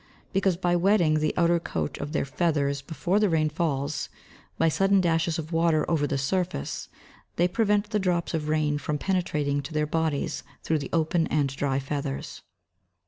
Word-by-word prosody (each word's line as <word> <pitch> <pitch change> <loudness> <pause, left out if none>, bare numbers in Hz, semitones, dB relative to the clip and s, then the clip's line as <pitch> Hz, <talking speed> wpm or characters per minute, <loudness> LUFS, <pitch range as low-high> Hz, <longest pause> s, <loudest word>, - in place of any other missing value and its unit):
_ - - -30 0.3
Because 190 -2 +2
by 175 -1 +1
wetting 175 -4 +3
the 155 0 +1
outer 170 -1 +3
coat 80 - -3
of 145 +1 -4
their 150 - 0
feathers 140 -1 0
before 170 +7 0
the 210 -2 +3
rain 155 -2 +2
falls, 150 -2 -1 0.5
by 165 - +3
sudden 195 +4 +3
dashes 165 -2 +1
of 160 0 -5
water 165 -1 +3
over 150 -3 +1
the 140 - -1
surface, 140 - -2 0.5
they 175 - +3
prevent 210 +1 +1
the 210 - +1
drops 180 -3 0
of 155 -2 -2
rain 150 -1 +1
from 150 +1 -2
penetrating 150 -6 0
to 150 +3 -8
their 150 0 +2
bodies 155 -1 -1 0.2
through 160 -1 +1
the 140 - -6
open 165 0 +1
and 145 -2 +1
dry 135 -1 0
feathers. 135 - -4
160 Hz, 180 wpm, -26 LUFS, 145-175 Hz, 0.5 s, wetting